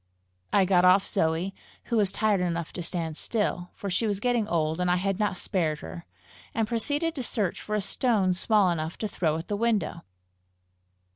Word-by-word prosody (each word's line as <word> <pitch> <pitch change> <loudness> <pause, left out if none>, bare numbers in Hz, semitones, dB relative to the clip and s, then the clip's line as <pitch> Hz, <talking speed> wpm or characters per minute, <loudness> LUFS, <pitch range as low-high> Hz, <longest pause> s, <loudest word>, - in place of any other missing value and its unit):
I 195 -2 +4
got 180 -1 +4
off 185 +2 +6
Zoe, 170 +1 0 0.3
who 235 - -1
was 200 -3 +3
tired 210 -2 +1
enough 170 -2 -2
to 180 - -4
stand 165 -2 -3
still, 190 -5 -1
for 200 - -6
she 200 +4 0
was 200 -2 -1
getting 240 -1 +1
old 160 -3 0
and 180 - +1
I 180 - +4
had 195 +2 -1
not 205 -3 0
spared 160 -6 -1
her, 80 +1 -9 0.5
and 225 -2 +1
proceeded 290 +8 0
to 285 - -4
search 205 -6 -1
for 210 - -3
a 210 - +1
stone 200 -3 +1
small 200 0 +3
enough 160 0 -3
to 215 - -2
throw 160 -6 0
at 165 - -7
the 205 - -1
window. 205 -6 0
190 Hz, 195 wpm, -27 LUFS, 170-215 Hz, 0.5 s, off